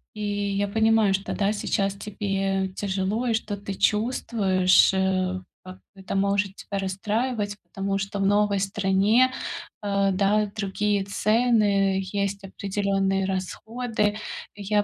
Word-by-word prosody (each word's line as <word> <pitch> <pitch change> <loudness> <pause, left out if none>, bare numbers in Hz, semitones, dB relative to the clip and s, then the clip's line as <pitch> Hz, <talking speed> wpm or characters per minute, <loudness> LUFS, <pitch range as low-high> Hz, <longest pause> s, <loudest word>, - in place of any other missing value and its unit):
И 210 - -6
я 205 0 -1
понимаю, 220 -1 +3
что, 195 +2 -2
да, 205 0 +1
сейчас 195 -1 0
тебе 195 -2 -2
тяжело, 200 +4 -1
и 230 - +2
что 215 -2 -2
ты 200 0 -6
чувствуешь, 195 -4 +3
э, 185 -1 0 0.2
как 185 0 -11 0.2
это 190 0 -7
может 200 0 +1
тебя 200 - -6
расстраивать, 205 +3 -2
потому 195 -1 -3
что 200 +1 -4
в 195 - +1
новой 205 0 +3
стране, 200 +5 +3 0.5
а, 200 -1 +1
да, 205 +2 +2
другие 205 0 0
цены, 205 -3 +2
есть 200 0 -2
определенные 195 0 -1
расходы. 210 +3 -2 0.4
Я 205 +1 0
200 Hz, 125 wpm, -25 LUFS, 195-210 Hz, 0.5 s, понимаю